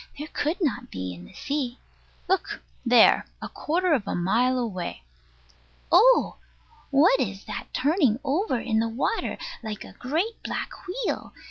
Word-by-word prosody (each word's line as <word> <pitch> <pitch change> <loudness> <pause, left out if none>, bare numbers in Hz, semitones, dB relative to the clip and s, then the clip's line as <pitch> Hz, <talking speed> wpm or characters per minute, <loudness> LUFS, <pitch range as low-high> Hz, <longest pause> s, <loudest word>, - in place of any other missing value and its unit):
There 300 +2 -6
could 310 +5 -1
not 250 -6 -1
be 90 0 -5
in 90 0 -11
the - - -15
sea. 275 -4 -3 0.5
Look 380 +1 -1 0.2
there, 240 -2 +6
a - - -5
quarter 350 +2 0
of 250 -9 0
a - - -1
mile 235 +9 +2
away. 185 - -3 0.9
Oh! 460 +9 +5 0.5
What 280 0 +5
is 200 -6 -3
that - - -6
turning 275 - +2
over 285 - 0
in 220 -2 0
the 230 0 +1
water, 250 - -1 0.2
like 215 -3 -5
a - - -12
great 330 - -2
black - - -3 0.2
wheel? 420 +6 -3
260 Hz, 150 wpm, -26 LUFS, 225-325 Hz, 0.9 s, there